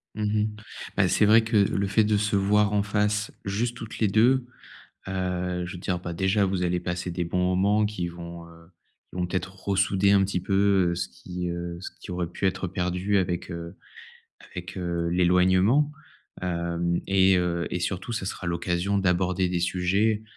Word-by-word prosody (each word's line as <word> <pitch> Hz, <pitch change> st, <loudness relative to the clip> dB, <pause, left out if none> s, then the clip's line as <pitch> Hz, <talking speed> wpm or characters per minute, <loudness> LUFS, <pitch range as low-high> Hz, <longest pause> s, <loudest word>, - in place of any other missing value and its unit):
Mmh 105 Hz, -, -3 dB, 0.2 s
mh. 105 Hz, -, +1 dB, 0.5 s
Bah, -, -, +4 dB
c'est 105 Hz, -, +3 dB
vrai 110 Hz, +2 st, +6 dB
que 110 Hz, -1 st, +1 dB
le 100 Hz, 0 st, +2 dB
fait 105 Hz, +3 st, +3 dB
de 105 Hz, 0 st, +2 dB
se 105 Hz, 0 st, 0 dB
voir 105 Hz, +1 st, +3 dB
en 100 Hz, -, +2 dB
face, 105 Hz, 0 st, 0 dB
juste 115 Hz, +5 st, -2 dB
toutes 110 Hz, -2 st, -8 dB
les 110 Hz, -, +3 dB
2, 120 Hz, +6 st, +3 dB, 0.6 s
heu, 90 Hz, -1 st, -2 dB
je 90 Hz, -, -6 dB
veux 90 Hz, -, -8 dB
dire, 90 Hz, -1 st, -1 dB
bah, 85 Hz, -1 st, -6 dB
déjà, 95 Hz, +4 st, +2 dB
vous 95 Hz, -1 st, -1 dB
allez 90 Hz, 0 st, 0 dB
passer 90 Hz, 0 st, -3 dB
des 85 Hz, 0 st, -2 dB
bons 90 Hz, +2 st, 0 dB
moments 100 Hz, +3 st, +3 dB
qui 105 Hz, -4 st, -3 dB
vont, 85 Hz, 0 st, -9 dB
heu, 85 Hz, 0 st, -17 dB, 0.4 s
qui -, -, -11 dB
vont 90 Hz, -, 0 dB
peut-être 90 Hz, +1 st, -3 dB
ressouder 100 Hz, 0 st, +2 dB
un 100 Hz, -1 st, +5 dB
petit 95 Hz, -2 st, -1 dB
peu, 95 Hz, -2 st, +2 dB
heu, -, -, -1 dB
ce 90 Hz, -, -3 dB
qui, 90 Hz, -1 st, -6 dB
heu, 85 Hz, 0 st, -5 dB
ce 95 Hz, -, -6 dB
qui -, -, -9 dB
aurait 90 Hz, -1 st, -2 dB
pu 95 Hz, -, -2 dB
être 95 Hz, 0 st, -1 dB
perdu 90 Hz, +2 st, -1 dB
avec, 90 Hz, -2 st, -1 dB
heu, 85 Hz, +1 st, -7 dB, 0.7 s
avec, 90 Hz, +2 st, -8 dB
heu, 85 Hz, -2 st, -2 dB
l'éloignement, 90 Hz, -, +3 dB, 0.5 s
hem 85 Hz, -1 st, -1 dB
et 95 Hz, -1 st, +4 dB
heu 85 Hz, -1 st, -1 dB
et 90 Hz, -, -2 dB
surtout, 95 Hz, +5 st, -3 dB
ça 110 Hz, -4 st, -3 dB
sera 90 Hz, -, -5 dB
l'occasion 85 Hz, +3 st, 0 dB
d'aborder 90 Hz, 0 st, +1 dB
des 90 Hz, -1 st, -1 dB
sujets, 95 Hz, +5 st, +1 dB
95 Hz, 190 wpm, -26 LUFS, 90-100 Hz, 0.7 s, vrai